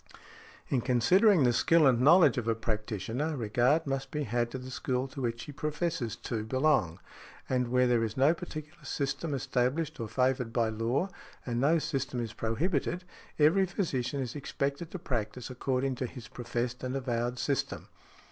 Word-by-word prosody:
In 130 - +1
considering 165 - +4
the 120 -1 +4
skill 160 +6 +4
and 125 -3 +4
knowledge 155 0 +6
of 115 - -5
a 115 - +2
practitioner 115 - -2
regard 125 +7 +2
must 135 -1 -2
be 150 +1 -2
had 120 0 0
to 130 - -5
the 130 0 -8
school 130 +1 -1
to 135 - -7
which 120 -1 -2
he 150 - -8
professes 150 -3 -2
to 110 -2 -4
|64| - - -10
belong; 130 - +2 0.5
and 125 -1 +1
where 125 +1 +3
there 120 -2 +3
is 110 +1 -3
no 140 +5 +5
particular 160 -2 -8
system 140 +3 -2
established 130 +4 -1
or 115 - -3
favoured 125 +1 0
by 115 -1 +1
law, 115 - 0 0.4
and 120 -1 -1
no 155 +5 +4
system 135 -5 -2
is 115 -2 -4
prohibited, 155 +9 -1 0.3
every 170 +6 +4
physician 140 - -2
is 125 0 -4
expected 140 +2 -3
to 185 - -5
practise 125 - -3
according 130 +1 -1
to 130 0 -3
his 120 -2 -10
professed 120 +1 -4
and 130 +1 -2
avowed 120 -2 -1
system. 135 +2 -2
130 Hz, 175 wpm, -30 LUFS, 120-150 Hz, 0.5 s, knowledge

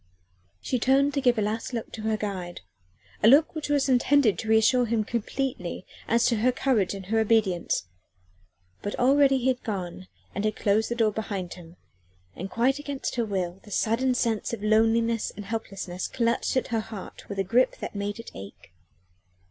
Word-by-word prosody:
She 255 - -1
turned 275 +4 +3
to 280 - 0
give 245 -2 +3
a 215 - +1
last 220 +4 -3
look 230 - -4
at - - -9
her 220 0 0
guide 185 -4 -5 0.6
a 210 - +5
look 285 +6 +6
which 310 -2 -5
was 285 -1 +2
intended 255 -5 +3
to 220 - -5
reassure 220 +3 +4
him 225 -1 +1
completely 235 -4 -3 0.2
as 235 +1 +3
to 235 - +2
her 245 +4 +3
courage 240 -7 +1
and 195 -1 -8
her 225 +4 +1
obedience: 210 - +1 1.0
but 205 - -4
already 270 +1 +4
he 255 0 -1
had 255 -1 0
gone 185 -4 -5 0.3
and 200 - -3
had 215 0 0
closed 215 +2 +1
the 235 - -1
door 225 -2 +2
behind 200 -4 -4
him, 170 -1 -13 0.6
and 185 +3 -6
quite 260 +6 +1
against 285 -2 -4
her 235 -2 0
will 185 -3 -3
the - - -15
sudden 230 +5 +1
sense 230 -2 -1
of 215 -3 -5
loneliness 225 +1 +2
and 205 - -7
helplessness 195 -4 -4
clutched 235 +2 0
at - - -1
her 230 -2 0
heart 215 -3 -9
with 200 - -5
a 195 - +1
grip 235 +7 +2
that - - -6
made 205 0 -3
it 230 - -9
ache. 95 -2 -11
225 Hz, 190 wpm, -26 LUFS, 200-250 Hz, 1.0 s, look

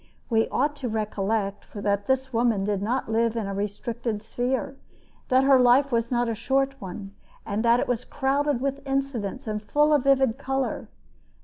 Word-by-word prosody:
We 225 0 +2
ought 290 +3 0
to 255 -4 -3
recollect 210 -1 -2
that 200 0 -1
this 265 0 0
woman 230 -4 +2
did 205 -2 -1
not 240 +6 -1
live 225 +1 +1
in 225 -3 -2
a 195 - -4
restricted 210 +2 -3
sphere, 255 +4 -2 0.5
that 260 0 +4
her 270 -1 +6
life 255 +3 +5
was 230 -1 0
not 240 -1 +1
a 230 - 0
short 270 +4 0
one, 195 +1 -7 0.3
and 210 +2 -2
that 235 +1 +4
it - - -1
was 245 -1 -1
crowded 280 -1 0
with 275 +1 -2
incidents 270 -3 -2
and 210 -1 -3
full 295 +7 +2
of 285 -3 +2
vivid 265 -3 +3
color. 270 -1 -2
240 Hz, 180 wpm, -25 LUFS, 215-270 Hz, 0.5 s, her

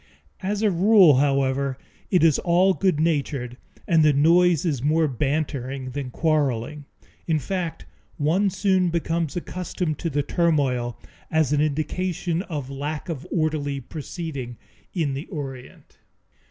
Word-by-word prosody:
As 205 +2 -2
a 210 - +4
rule, 185 - +6
however, 135 -1 +1 0.3
it 180 -3 +3
is 160 -4 +4
all 180 +2 +3
good 185 -5 +1
natured, 140 -6 -1 0.3
and 165 -2 +4
the 155 -1 +5
noise 170 +3 +4
is 145 -8 0
more 155 +3 +2
bantering 135 -1 -2
than 140 -1 -4
quarreling. 145 -1 -1 0.4
In 160 -2 +2
fact, 165 - -4 0.3
one 175 +7 +2
soon 190 -1 +1
becomes 165 -2 -1
accustomed 175 -3 -3
to 170 - -2
the 145 -1 0
turmoil 140 -9 0 0.3
as 160 -2 +2
an 145 - +2
indication 165 +3 -1
of 150 -9 -5
lack 145 +5 -4
of 145 -5 -5
orderly 155 -4 -1
proceeding 140 -3 -6 0.3
in 160 -7 -1
the 140 +5 -5
Orient. 135 - -8
155 Hz, 135 wpm, -24 LUFS, 140-170 Hz, 0.4 s, rule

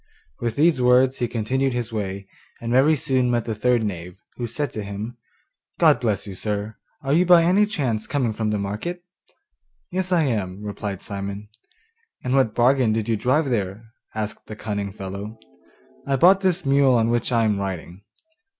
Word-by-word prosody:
With 115 -1 -2
these 155 -3 +3
words 125 +1 +4
he 120 - +1
continued 130 +4 -1
his 120 -1 -3
way, 100 -2 -4 0.3
and 115 0 -4
very 135 +5 +5
soon 130 -3 +1
met 120 -2 0
the 115 - -2
third 120 +2 +1
knave, 90 -3 -5 0.2
who 120 - -3
said 145 +6 -3
to 110 - -4
him, 100 +4 -6 0.6
'God - - +5
bless 110 -6 -1
you, 100 - -7
sir; 105 +2 -3 0.3
are 135 +1 0
you 170 +4 +5
by 175 -2 +6
any 195 +5 +4
chance 130 - -2
coming 130 -6 0
from 110 0 -2
the 105 - 0
market?' 105 - -4 0.9
'Yes, 185 0 -2
I 170 -3 +4
am,' 105 -7 -2
replied 100 -2 -5
Simon. 100 +1 -6 0.7
'And 125 - -1
what 130 -5 +2
bargain 125 -1 +3
did 110 -1 -1
you 115 - +2
drive 130 +6 +1
there?' 105 0 -3 0.2
asked 110 -1 -4
the 110 - -7
cunning 100 -2 -4
fellow. 100 +2 -7 0.7
'I 140 - +2
bought 185 +8 +6
this 185 -3 +1
mule 135 -1 +4
on 115 -1 +2
which 120 +1 0
I 115 -2 +3
am 105 -2 +1
riding. 95 -1 -5
115 Hz, 180 wpm, -23 LUFS, 105-135 Hz, 0.9 s, by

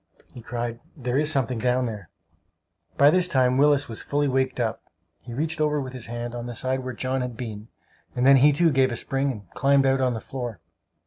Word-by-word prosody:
he 120 - -10
cried. 120 0 -4 0.2
"There 125 0 -1
is 155 +1 +1
something 130 -4 0
down 125 +1 +1
there." 105 -7 -6 0.9
By 140 +1 +7
this 180 +1 +3
time 130 -5 +2
Willis 145 0 +4
was 115 - -6
fully 145 0 0
waked 130 -1 0
up. 115 -1 -1 0.4
He 120 - -7
reached 155 +3 -2
over 150 -1 +1
with 130 -2 -5
his 130 -3 -6
hand, 120 0 -5
on 120 0 -5
the 120 - -6
side 130 +2 -1
where 130 -1 -5
John 130 +2 -2
had 125 -2 -5
been, 110 -3 -7 0.5
and 125 - +1
then 135 0 +8
he, 145 +3 +6
too, 165 +3 +3
gave 130 -2 +3
a - - -2
spring 135 +3 -1
and 105 -6 -10
climbed 140 0 +3
out 135 0 +2
on 125 -2 +1
the - - -4
floor! 120 -6 -6
130 Hz, 220 wpm, -25 LUFS, 120-140 Hz, 0.9 s, then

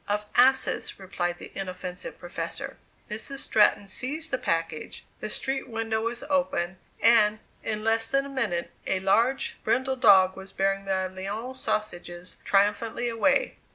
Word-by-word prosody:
"Of 210 +1 -1
asses," 265 +2 +3
replied 175 -2 -3
the - - -10
inoffensive 185 -1 -5
professor. 175 0 -5 0.3
Mrs. 230 +5 -4
Stratton 210 -5 +3
seized 290 +11 -2
the 260 - 0
package, 165 -2 -2
the 215 - -4
street 270 +4 -3
window 225 -1 -1
was 235 +1 -3
open, 270 -11 0 0.2
and, 215 -2 +5 0.2
in 215 -1 -3
less 225 0 +2
than 275 0 +2
a - - -7
minute, 205 -11 -1 0.2
a 190 - +1
large 230 +8 +2
brindle 260 +4 +1
dog 190 -6 +6
was 195 0 -10
bearing 195 0 0
the 190 -1 0
"Lyons 205 +8 -5
sausages" 180 -5 -3
triumphantly 210 +4 +1
away. 280 - +2
215 Hz, 145 wpm, -27 LUFS, 190-245 Hz, 0.3 s, dog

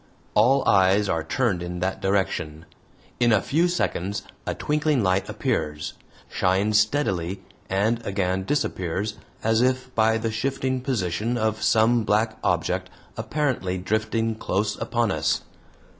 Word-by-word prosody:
All 135 +3 +4
eyes 95 +2 +4
are 80 -3 0
turned 100 0 0
in 90 0 -5
that 95 +2 -2
direction. 85 -5 -1 0.5
In 120 -1 +4
a 110 - +5
few 160 - +1
seconds 100 - -1 0.2
a - - -1
twinkling 150 -4 +1
light 95 0 +1
appears, 75 0 -2 0.3
shines 100 +3 +2
steadily, 100 - 0 0.3
and 110 +5 +1
again 95 -1 -1
disappears 95 - -2 0.2
as 110 +1 +3
if 130 0 0
by 110 0 +3
the 115 0 -2
shifting 130 +2 -1
position 115 -2 -1
of 110 -1 -1
some 115 +1 +3
black 110 +1 +1
object - - 0 0.3
apparently 130 -11 -1
drifting 110 +4 0
close 105 -1 -1
upon 120 -3 0
us. 80 -1 0
110 Hz, 130 wpm, -24 LUFS, 95-120 Hz, 0.5 s, a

